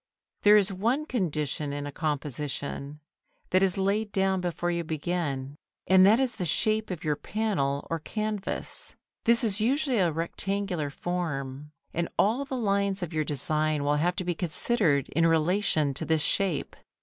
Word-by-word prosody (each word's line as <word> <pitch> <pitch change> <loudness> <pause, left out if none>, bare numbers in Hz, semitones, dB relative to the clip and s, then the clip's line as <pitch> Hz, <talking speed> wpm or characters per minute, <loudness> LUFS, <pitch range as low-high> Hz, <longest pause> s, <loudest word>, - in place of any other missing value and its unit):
There 210 0 +7
is 200 -1 +2
one 235 +10 0
condition 155 - -1
in 145 0 -4
a 145 - -5
composition, 145 -1 -4 0.5
that 185 - +4
is 190 -1 +2
laid 205 +2 0
down 190 -1 +1
before 175 0 -1
you 170 0 -1
begin, 150 -4 -3 0.3
and 185 0 +6
that 220 +4 +5
is 260 -2 0
the - - -2
shape 215 +6 +1
of 180 -4 -5
your 150 -2 +1
panel 145 -6 -1
or 165 - -2
canvas. 215 +4 -4 0.3
This 235 +2 +5
is 210 -2 +1
usually 260 +1 +2
a 175 -3 +3
rectangular 175 0 -2
form, 145 -4 -4 0.2
and 170 0 -1
all 235 +7 +2
the 265 -1 -4
lines 200 -3 0
of 175 -1 -5
your 155 -1 +1
design 150 +1 0
will 145 +1 +2
have 175 +4 +1
to - - -3
be 175 - 0
considered 170 - +1
in 165 +2 +2
relation 160 -2 +2
to 135 - +2
this 160 -2 +1
shape. 190 -8 0
175 Hz, 165 wpm, -28 LUFS, 150-205 Hz, 0.5 s, There